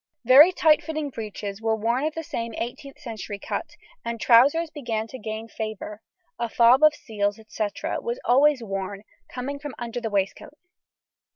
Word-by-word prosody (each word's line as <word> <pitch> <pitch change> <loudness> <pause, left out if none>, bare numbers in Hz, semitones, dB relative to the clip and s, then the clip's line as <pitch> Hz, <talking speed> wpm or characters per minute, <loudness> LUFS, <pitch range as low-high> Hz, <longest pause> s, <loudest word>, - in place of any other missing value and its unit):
Very 280 +8 +9
tight 315 -4 +4
fitting 310 -2 -4
breeches 210 -2 -6
were 225 0 +1
worn 235 +6 0
of 310 - -2
the 325 - -4
same 230 -6 -4
18th 270 +5 -6
century 225 -6 -7
cut, - - -5 0.3
and 230 0 -4
trousers 285 +9 +5
began 235 -7 -3
to 260 +3 -10
gain 220 +1 -5
favour; 215 -1 -6 0.4
a 235 -1 -1
fob 240 +4 +5
of 305 -1 +6
seals, 205 -3 -2
&c., 215 -1 -2 0.3
was 475 +1 -3
always 275 0 +4
worn, 195 -1 -5 0.3
coming 275 +3 -5
from 290 -2 -7
under 240 0 -5
the 225 - -2
waistcoat. 200 +8 -2
235 Hz, 165 wpm, -25 LUFS, 220-285 Hz, 0.4 s, Very